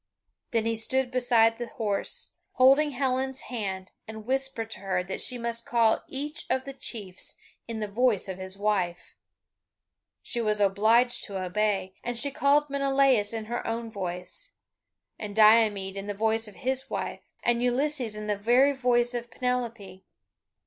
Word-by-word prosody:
Then 225 -2 0
he 230 0 +1
stood 250 +3 +2
beside 235 -3 +3
the 240 - -3
horse, 210 -4 -3 0.2
holding 275 +4 +5
Helen's 265 0 -1
hand, 190 -6 -5 0.2
and 220 -1 -8
whispered 260 -3 -1
to - - -6
her 185 -2 -1
that 190 +1 -5
she 250 - 0
must 235 0 -2
call 230 -2 +3
each 295 +4 -5
of 260 - 0
the 275 - -6
chiefs 205 -8 -7 0.3
in 225 -1 -4
the 210 - -1
voice 220 -1 +1
of 190 -1 -6
his 190 +1 -6
wife. 195 -4 -1 1.1
She 235 - -2
was 210 -2 0
obliged 220 +5 +3
to 195 -3 -5
obey, 190 0 -1
and 240 0 -3
she 280 +3 +1
called 285 +2 +3
Menelaus 275 -6 +2
in 225 -1 -4
her 240 +2 -4
own 230 0 -3
voice, 185 - -5 0.7
and 205 -2 -6
Diomede 215 -3 +5
in 195 0 -6
the 205 - -3
voice 220 +1 0
of 210 - -12
his 265 0 -3
wife, - - -4 0.2
and 240 0 +2
Ulysses 250 -2 +1
in 210 0 -6
the 210 -1 0
very 245 +7 +4
voice 245 -2 +2
of 240 0 -4
Penelope. 230 -7 -3
230 Hz, 165 wpm, -27 LUFS, 205-255 Hz, 1.1 s, holding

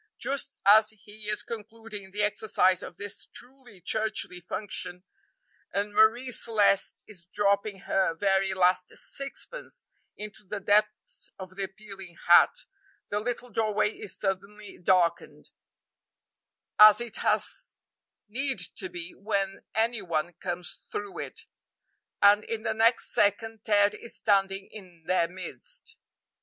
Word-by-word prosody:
Just 275 0 -2
as 215 +2 +7
he 210 0 -9
is 210 - 0
concluding 220 -2 -8
the 205 +2 -1
exercise 205 -3 +2
of 175 - -9
this 205 0 -3
truly 250 -6 -12
churchly 215 -1 -1
function, 180 -1 -5 0.7
and 205 +1 -2
Marie 235 +5 +4
Celeste 210 -4 +2
is 180 -6 -11
dropping 200 +1 0
her 190 -4 +1
very 195 +1 +2
last 180 0 +3
sixpence 280 - -6 0.3
into 210 0 -8
the 205 +1 -5
depths 210 +2 +1
of 185 -1 -9
the 195 0 -2
appealing 195 -3 -12
hat, - - +6 0.4
the 205 - 0
little 245 +2 -4
doorway 215 -1 +1
is - - -5
suddenly 200 +1 -4
darkened 180 -1 +1 1.3
as 215 0 +10
it 240 -2 -4
has - - -1 0.5
need 265 +5 -1
to 190 -3 -4
be 175 0 -6
when 195 -2 -2
any 225 0 +1
one 170 -1 -2
comes 175 0 -5
through 205 -1 -5
it - - -6 0.8
and 205 +1 +7
in 225 -1 -4
the 220 -1 0
next 230 +2 +3
second 220 +2 +1
Ted 205 -1 +4
is 235 - -5
standing 195 -1 +1
in 180 -6 -13
their 180 -1 +2
midst. 175 -7 -8
205 Hz, 130 wpm, -28 LUFS, 190-220 Hz, 1.3 s, as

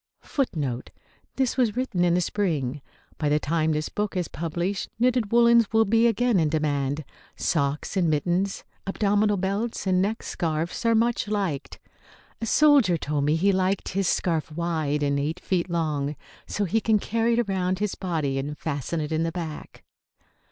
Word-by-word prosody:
[Footnote 145 - -2
B: - - -36 0.3
This 265 -1 0
was 235 -5 +2
written 245 -8 0
in 175 -1 +3
the 180 - +2
spring. 150 -9 -1 0.4
By 150 - +1
the 150 - +3
time 160 +1 0
this 155 0 -1
book 210 -2 -3
is 175 -3 -1
published 170 +4 -3
knitted 245 -2 +2
woollens 235 -1 +5
will 225 0 +4
be 230 +3 +4
again 235 -2 +2
in 155 -2 +2
demand. 145 -2 -1 0.3
Socks 145 +2 -1
and 180 -4 +2
mittens, 175 +6 0 0.2
abdominal 205 +1 +2
belts 200 +5 -2
and 185 -1 +2
neck 210 +4 -1
scarfs 165 +6 -2
are 230 - +4
much 230 0 +1
liked. 195 -9 -2 0.6
A 225 - -2
soldier 280 - +5
told 145 -2 -1
me 150 +2 +3
he 195 +5 +3
liked 190 0 0
his 195 0 0
scarf 160 -4 0
wide, 155 -3 -1
and 140 0 +1
eight 155 +5 -2
feet 180 -1 -1
long, 155 -4 -1 0.3
so 205 - -1
he 220 +5 +1
can 220 0 +3
carry 230 +3 0
it 240 -3 +1
around 185 -1 0
his 210 0 -1
body 155 -7 -2
and 145 +2 -4
fasten 155 +2 -3
it 150 - -4
in 160 0 +1
the 165 0 0
back. 160 -3 -7
180 Hz, 175 wpm, -25 LUFS, 155-210 Hz, 0.6 s, woollens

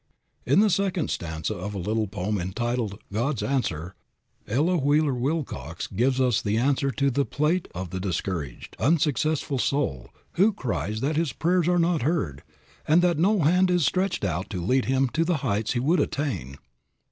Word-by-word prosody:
In - - +5
the 215 -1 +4
second 190 -3 0
stanza 80 -2 -3
of 100 +3 -5
a - - -3
little 110 +4 -1
poem 100 +2 -2
entitled 110 +3 -2 0.2
"God's 120 +4 -1
Answer," 90 - -2 0.5
Ella 150 - +2
Wheeler 145 0 +2
Wilcox 140 +4 -3
gives 125 +6 0
us 125 -4 +2
the 105 +1 0
answer 135 +3 +1
to 140 +2 +1
the 140 +3 +1
plaint 155 +7 0
of 90 -1 -5
the 95 - -3
discouraged, 90 -7 -4
unsuccessful 150 0 +1
soul, 80 - -1 0.2
who 205 +5 +3
cries 110 - -3
that 150 +3 0
his 160 -6 0
prayers 175 +2 +1
are 180 0 +3
not 170 -1 +2
heard, 115 - -1 0.5
and 165 +4 +5
that 175 -3 +2
no 200 +3 +3
hand 180 +5 +4
is 175 -4 +2
stretched 185 - 0
out 90 0 -2
to 90 -3 -4
lead 130 +5 +2
him 135 +1 +2
to 165 +6 +1
the 170 -1 +1
heights 105 +3 0
he 120 - 0
would 155 +8 +2
attain. 95 - -2
135 Hz, 175 wpm, -25 LUFS, 100-160 Hz, 0.5 s, In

